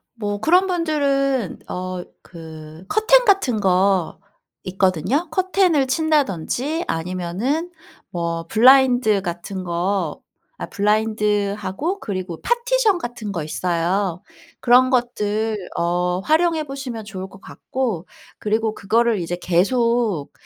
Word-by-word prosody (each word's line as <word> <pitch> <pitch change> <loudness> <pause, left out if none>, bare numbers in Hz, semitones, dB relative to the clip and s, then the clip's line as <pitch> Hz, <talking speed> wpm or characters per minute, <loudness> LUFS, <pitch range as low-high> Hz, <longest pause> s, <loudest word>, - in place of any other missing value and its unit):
뭐 205 -3 -4
그런 360 - +4
분들은 280 - 0
어 185 0 -5 0.2
그 160 -1 -11
커튼 - - +4
같은 385 - +2
거 190 -2 +2 0.5
있거든요. 190 - 0
커튼을 370 -6 +2
친다든지 290 - 0
아니면은 185 - -2 0.4
뭐 170 -1 -3
블라인드 245 -3 +5
같은 180 +2 -5
거 175 -1 -2 0.4
아 - - -5
블라인드하고 210 - -1
그리고 185 -5 -5
파티션 480 -3 +2
같은 240 -8 -6
거 170 -6 -3
있어요. 180 +3 -1 0.4
그런 250 +1 +5
것들 220 -3 0 0.2
어 180 +1 0
활용해 315 - +2
보시면 265 -5 -6
좋을 190 -2 -7
것 195 +1 -16
같고 230 -10 -4 0.3
그리고 220 +1 -1
그거를 225 +1 +1
이제 175 +1 -3
계속 215 - +1
215 Hz, 240 characters per minute, -21 LUFS, 185-275 Hz, 0.5 s, 블라인드